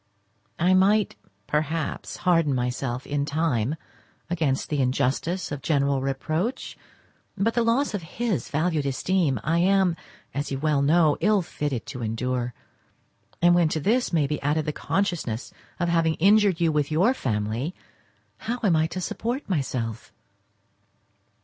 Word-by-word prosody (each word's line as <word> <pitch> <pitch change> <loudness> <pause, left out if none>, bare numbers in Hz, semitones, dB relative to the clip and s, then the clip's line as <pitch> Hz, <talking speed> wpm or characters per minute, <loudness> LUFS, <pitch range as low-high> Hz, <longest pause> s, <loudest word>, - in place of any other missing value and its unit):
I 180 +3 +3
might 200 +2 +3 0.3
perhaps 155 +2 -2
harden 165 -6 +2
myself 125 +1 -2
in 145 0 -1
time 145 -4 0 0.6
against 155 -6 0
the 145 -2 0
injustice 135 +8 0
of 145 -1 -4
general 140 -3 +1
reproach, 155 - -2 0.6
but 220 +4 +1
the 235 - +2
loss 235 +4 +1
of 205 - -2
his 210 +4 -3
valued 155 -1 0
esteem 140 - +1
I 165 +3 +1
am, 190 -1 +3 0.4
as 145 +1 -3
you 135 - -1
well 150 0 +1
know, 155 +1 +4
ill 205 +1 +3
fitted 145 -7 -3
to 140 -3 -7
endure; 120 +2 -2 0.9
and 175 0 +7
when 175 -2 +4
to 155 - -1
this 235 - +1
may 160 -4 +2
be 150 +2 -3
added 150 +2 0
the 150 - -2
consciousness 170 - -2 0.3
of 175 - +1
having 165 -1 +2
injured 200 0 +4
you 165 -2 +3
with 150 -2 0
your 185 +11 +3
family, 115 - -2 0.6
how 240 +2 -3
am 190 -6 +4
I 160 0 +2
to 185 +3 -5
support 240 +9 -3
myself? 125 - -3
155 Hz, 145 wpm, -25 LUFS, 135-185 Hz, 0.9 s, and